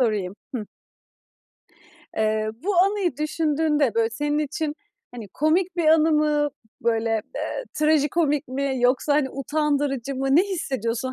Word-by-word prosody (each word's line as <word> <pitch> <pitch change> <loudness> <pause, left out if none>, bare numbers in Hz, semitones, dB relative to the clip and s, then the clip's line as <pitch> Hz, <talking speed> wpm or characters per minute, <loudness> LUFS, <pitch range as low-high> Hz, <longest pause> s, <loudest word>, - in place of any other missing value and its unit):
sorayım 210 -6 0 0.2
Hıh. 225 -4 -2 1.5
Eee, 215 0 +1
bu 400 +3 0
anıyı 385 0 +2
düşündüğünde, 300 -3 +1
böyle, 230 0 +2
senin 295 +6 -1
için, 300 0 -2 0.4
hani, 230 -5 -8
komik 340 - +1
bir 340 -2 +1
anı 320 0 +5
mı? 300 -1 +2 0.3
Böyle, 225 -1 +1 0.3
eee, - - -3
trajikomik 305 -1 +2
mi 275 +1 -1
yoksa, 255 +4 +2
hani, 285 -3 +1
utandırıcı 280 -2 -1
mı? 270 +1 -2
Ne 345 - +7
hissediyorsun? 260 - -2
290 Hz, 130 wpm, -24 LUFS, 245-310 Hz, 1.5 s, Ne